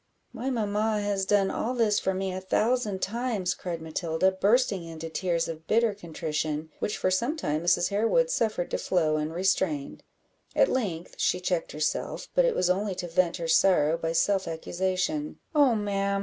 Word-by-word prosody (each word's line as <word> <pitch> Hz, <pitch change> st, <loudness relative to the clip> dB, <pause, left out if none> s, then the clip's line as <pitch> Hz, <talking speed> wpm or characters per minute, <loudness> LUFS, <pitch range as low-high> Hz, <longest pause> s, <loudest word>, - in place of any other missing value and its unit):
"My 250 Hz, +2 st, -3 dB
mamma 215 Hz, -2 st, 0 dB
has 200 Hz, -2 st, -1 dB
done 200 Hz, -1 st, +3 dB
all 250 Hz, +3 st, -2 dB
this 220 Hz, -4 st, +2 dB
for 190 Hz, -, -1 dB
me 190 Hz, 0 st, -2 dB
a 185 Hz, -, -4 dB
thousand 210 Hz, 0 st, 0 dB
times," 220 Hz, -4 st, -1 dB
cried 170 Hz, -3 st, -5 dB
Matilda, 160 Hz, +3 st, 0 dB
bursting 200 Hz, 0 st, +2 dB
into 165 Hz, -1 st, -7 dB
tears 170 Hz, -1 st, 0 dB
of 160 Hz, 0 st, -7 dB
bitter 225 Hz, 0 st, +3 dB
contrition, 155 Hz, -4 st, -3 dB
which, 210 Hz, -, -2 dB
for 185 Hz, -, 0 dB
some 240 Hz, -, 0 dB
time, 155 Hz, -, -1 dB
Mrs. 175 Hz, 0 st, +2 dB
Harewood 230 Hz, -, +2 dB
suffered 215 Hz, -, -1 dB
to -, -, -1 dB
flow 155 Hz, -4 st, +1 dB
unrestrained; 160 Hz, -1 st, -1 dB, 0.5 s
at -, -, +4 dB
length 180 Hz, -10 st, -2 dB
she 180 Hz, -, +2 dB
checked 180 Hz, -2 st, -1 dB
herself, 155 Hz, +1 st, -2 dB
but -, -, +4 dB
it -, -, +1 dB
was 180 Hz, -, +2 dB
only 190 Hz, +2 st, 0 dB
to 180 Hz, -1 st, -4 dB
vent 175 Hz, +1 st, +1 dB
her 170 Hz, -2 st, -4 dB
sorrow 165 Hz, -2 st, +4 dB
by 165 Hz, -1 st, -2 dB
self 190 Hz, +3 st, +1 dB
accusation 185 Hz, -, -2 dB, 0.2 s
"Oh, 285 Hz, -6 st, +5 dB
ma'am! 200 Hz, -1 st, 0 dB
190 Hz, 175 wpm, -27 LUFS, 165-215 Hz, 0.5 s, Oh